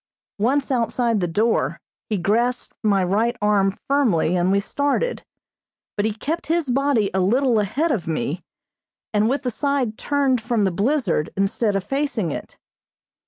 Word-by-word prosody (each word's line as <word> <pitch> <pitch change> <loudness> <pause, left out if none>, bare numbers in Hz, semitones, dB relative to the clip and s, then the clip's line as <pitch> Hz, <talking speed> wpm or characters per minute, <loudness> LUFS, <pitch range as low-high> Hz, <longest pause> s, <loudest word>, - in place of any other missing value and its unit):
Once 270 +6 +1
outside 235 -2 +1
the 175 - 0
door, 215 +7 0 0.3
he 215 - 0
grasped 235 +7 0
my 200 -3 +2
right 215 +6 +1
arm 205 -2 +2 0.2
firmly 225 - +2
and 180 +1 +2
we 200 - +3
started, 285 - -1 0.7
but 205 - 0
he 220 - +1
kept 305 +10 -4
his 325 -4 0
body 265 -6 +1
a 190 - +1
little 235 +5 +3
ahead 275 - 0
of 205 -11 -2
me, 160 +1 -2 0.7
and 210 +1 +3
with 275 0 -1
side 265 -3 -1
turned 275 -4 +1
from 225 -1 0
the 190 - +2
blizzard 200 - 0
instead 195 +2 +1
of 195 - 0
facing 270 - -1
it. - - -7
225 Hz, 155 wpm, -22 LUFS, 195-275 Hz, 0.7 s, we